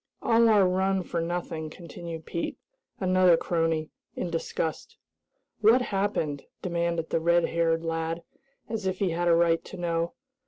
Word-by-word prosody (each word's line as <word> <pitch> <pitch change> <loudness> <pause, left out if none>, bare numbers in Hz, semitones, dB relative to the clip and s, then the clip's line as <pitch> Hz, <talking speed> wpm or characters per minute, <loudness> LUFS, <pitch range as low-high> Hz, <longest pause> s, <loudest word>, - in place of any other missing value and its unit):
"All 230 0 +5
our 205 -4 +5
run 190 +1 +1
for 170 -1 -2
nothing," 165 -2 -3
continued 165 0 -8
Pete, 170 - -3 0.4
another 185 -2 +5
crony, 165 -2 0 0.2
in 175 - -3
disgust. 165 -1 -3 0.6
"What 230 +4 +5
happened?" 195 - -1 0.2
demanded 170 -2 -1
the - - +2
red 170 +1 +3
haired 165 -1 +1
lad, 165 +1 -2 0.4
as 220 -4 -3
if 185 0 -1
he 190 -3 0
had 175 +1 0
a 170 - +6
right 165 -1 +3
to 190 - -9
know. 170 -1 -1
170 Hz, 150 wpm, -27 LUFS, 165-185 Hz, 0.6 s, a